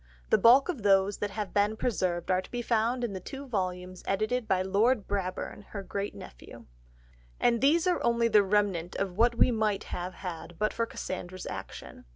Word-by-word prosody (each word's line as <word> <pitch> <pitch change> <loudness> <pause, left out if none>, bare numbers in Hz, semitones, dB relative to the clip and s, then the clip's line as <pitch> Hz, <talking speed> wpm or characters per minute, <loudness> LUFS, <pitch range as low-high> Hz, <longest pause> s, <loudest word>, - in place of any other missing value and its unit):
The - - +6
bulk 255 +4 +6
of 335 -10 -3
those 195 0 +3
that 205 - -1
have 205 -2 -5
been 205 +1 +2
preserved 185 -7 -1
are 185 0 +2
to - - -14
be 245 -1 -4
found 235 +2 +1
in 230 -4 -2
the 190 - -4
two 270 +8 -8
volumes 185 -5 -3
edited 215 +4 0
by 185 -1 +2
Lord 210 +4 +2
Brabourne, 195 0 -3
her 200 -2 -4
great 200 +2 -4
nephew. - - -12 0.7
And 235 -1 +2
these 320 +5 +4
are 360 -1 +1
only 235 0 +2
the 215 -2 +5
remnant 195 -4 0
of 195 -2 -2
what 235 +3 +3
we 245 - +4
might 215 -3 0
have 180 +1 -4
had 175 -2 -7
but 215 +3 0
for 230 0 -1
Cassandra's 185 -3 -6
action. - - -8
205 Hz, 195 wpm, -29 LUFS, 185-235 Hz, 0.7 s, The